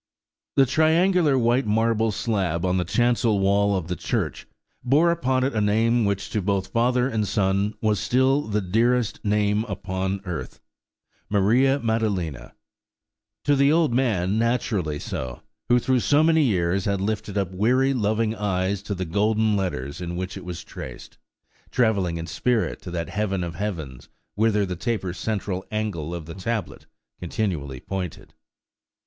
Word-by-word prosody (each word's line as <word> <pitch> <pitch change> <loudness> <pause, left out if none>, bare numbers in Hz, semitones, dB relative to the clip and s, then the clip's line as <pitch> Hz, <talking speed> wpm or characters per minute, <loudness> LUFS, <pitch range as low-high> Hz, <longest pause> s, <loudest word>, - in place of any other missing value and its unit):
The 135 - +6
triangular 160 +2 +3
white 120 0 +2
marble 115 +1 +2
slab 95 -5 -1
on 90 0 +1
the 90 - +1
chancel 120 +2 +2
wall 100 +1 +3
of 85 -3 -4
the 90 - -2
church - - -3 0.4
bore 150 +7 +4
upon 130 -6 +1
it 135 - 0
a 110 - 0
name 110 +3 +2
which 100 0 -2
to 105 - 0
both 95 0 -1
father 125 +2 +2
and 110 -5 -1
son 100 +1 +1
was 105 -3 +1
still 130 +6 +2
the 105 -6 -1
dearest 115 +4 +1
name 105 0 +1
upon 95 -2 -3
earth, 85 -4 -5 0.7
"Maria 120 +7 +3
Maddalena:"–to 105 - -4
the 140 +1 +4
old 160 -5 +3
man 110 -6 +1
naturally 110 -9 0
so, 65 -3 -5 0.3
who 120 - +6
through 130 +1 +2
so 145 +5 +3
many 160 0 +4
years 95 - +1
had 100 -1 0
lifted 105 0 -2
up 95 -2 -1
weary, 125 +8 +2
loving 110 -1 0
eyes 100 -2 -1
to 100 0 -4
the 95 0 -3
golden 105 +4 +1
letters 90 -5 -3
in 85 0 -4
which 90 +1 -4
it - - -8
was 85 -2 -6
traced, - - -10 0.5
travelling 100 -8 +1
in 80 - -4
spirit 120 +7 -1
to - - -8
that 85 -1 -4
heaven 100 -3 -1
of 85 -1 -4
heavens 80 -9 -5 0.2
whither 105 -1 +2
the 90 -1 -4
taper 95 -2 -2
central 95 -2 -3
angle 95 -7 -3
of 85 -3 -6
the 80 - -8
tablet 105 +1 -4 0.3
continually 85 - -3
pointed. 90 -1 -6
105 Hz, 155 wpm, -24 LUFS, 95-120 Hz, 0.7 s, The